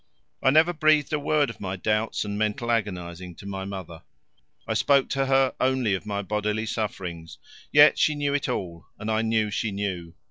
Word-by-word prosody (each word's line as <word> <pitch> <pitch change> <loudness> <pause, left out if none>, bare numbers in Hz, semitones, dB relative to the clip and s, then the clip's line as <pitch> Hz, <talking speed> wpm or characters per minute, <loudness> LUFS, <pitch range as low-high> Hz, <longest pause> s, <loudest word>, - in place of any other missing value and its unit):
I 135 - +4
never 160 +5 +4
breathed 155 -2 +2
a 150 - +1
word 145 -3 +1
of - - -15
my 95 -1 -4
doubts 105 +3 -1
and 100 0 -4
mental 110 +3 -1
agonizing 90 -5 -3
to - - -13
my 95 -1 -5
mother; 95 -5 -7 0.7
I - - 0
spoke 140 -2 +3
to 135 0 0
her 135 -1 +3
only 130 -5 +1
of 95 +2 -4
my 100 -1 -2
bodily 105 +2 -1
sufferings; 90 -7 -5 0.3
yet 145 +1 +7
she 155 - +3
knew 145 -1 -1
it 140 -2 -1
all, 85 -8 -4
and 105 +2 -4
I 110 0 +1
knew 110 -1 +1
that 105 - -6
she 105 +2 -1
knew. 95 -4 -4
105 Hz, 200 wpm, -25 LUFS, 95-135 Hz, 0.7 s, yet